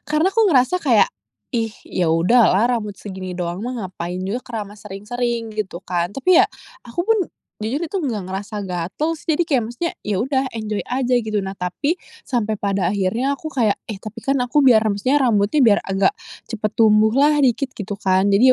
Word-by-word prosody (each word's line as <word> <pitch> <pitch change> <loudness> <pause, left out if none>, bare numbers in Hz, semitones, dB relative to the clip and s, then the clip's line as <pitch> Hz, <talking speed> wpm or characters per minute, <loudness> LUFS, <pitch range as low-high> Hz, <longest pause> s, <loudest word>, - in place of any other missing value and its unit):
Karena 310 +5 +2
aku 445 +2 +3
ngerasa 280 0 +3
kayak, 250 - +3 0.4
"Ih 225 -2 -1
ya 180 -2 -1
udah 185 +5 +4
lah, 200 +4 +3
rambut 210 -2 -6
segini 190 -2 -7
doang 175 0 -3
mah 255 - -3 0.2
ngapain 180 0 -5
juga 195 +6 -2
keramas 210 -3 -7
sering-sering," 230 +3 -3
gitu 205 -4 -5
kan. 175 +1 -2
Tapi 345 +7 +4
ya - - +6 0.4
aku 240 +9 -2
pun 445 +4 +2 0.4
jujur 240 +9 -2
itu 340 +4 -3
nggak 245 - -2
ngerasa 205 +2 -4
gatel 180 - -2
sih. 320 +1 0
Jadi 345 - +2
kek 300 -6 +2
maksudnya 240 +9 -3
ya 210 - 0
udah 265 +1 0
enjoy 215 -2 -3
aja 255 0 0
gitu. 215 -3 -1
Nah 190 0 -4
tapi, 285 - -1 0.2
sampai 230 - -1
pada 195 -2 0
akhirnya 210 +8 0
aku 315 +3 -7
kayak, 235 -7 +2 0.2
"Eh, 205 - -5
tapi 215 +3 -9
kan 275 0 +1
aku 250 +4 +2
biar 250 -4 +7
ram 215 -2 0
maksudnya 255 +8 +2
rambutnya 225 -1 +2
biar 225 -6 +5
agak 195 - +1 0.3
cepat 215 -2 -2
tumbuh 215 -1 +5
lah 295 +2 +5
dikit," 260 +1 +1
gitu 205 -1 -5
kan. 190 0 +2
Jadi 240 +6 +6
220 Hz, 195 wpm, -21 LUFS, 200-265 Hz, 0.4 s, biar